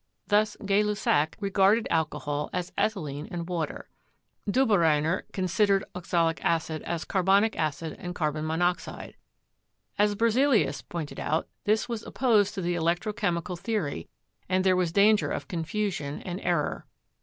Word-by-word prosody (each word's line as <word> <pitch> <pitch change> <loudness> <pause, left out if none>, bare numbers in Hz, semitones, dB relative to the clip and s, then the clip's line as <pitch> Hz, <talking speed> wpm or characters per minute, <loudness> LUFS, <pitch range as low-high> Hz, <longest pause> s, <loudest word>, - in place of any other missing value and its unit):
Thus, 210 +1 +2
Gay 200 +1 +3
Lussac 200 -7 +1
regarded 200 +2 +3
alcohol 150 -2 -1
as 180 0 -3
ethylene 150 -9 -2
and 170 -1 -5
water. 170 -4 -3 0.6
Dobereiner 175 - +2
considered 195 +2 +2
ox 180 -1 -9
alic 165 -2 +2
acid 160 -1 0
as 170 -2 -3
carbonic 195 +3 +3
acid 155 +1 -2
and 180 0 -6
carbon 155 -1 -1
monoxide. 175 +3 -2 0.8
As 205 0 +3
Ber 230 +2 +2
zelius 235 - +2
pointed 165 -4 -6
out, 160 +2 -1 0.2
this 215 +1 +2
was 230 -3 -3
opposed 215 -6 +2
to 195 - -3
the 175 +1 0
electro 175 +5 0
chemical 180 -5 -1
theory, 175 - -3 0.4
and 185 0 +2
there 185 -1 +4
was 180 -2 +1
danger 205 +3 +4
of - - -4
confusion 175 -4 -3
and 180 +1 -5
error. 170 -4 -1
180 Hz, 145 wpm, -27 LUFS, 160-205 Hz, 0.8 s, there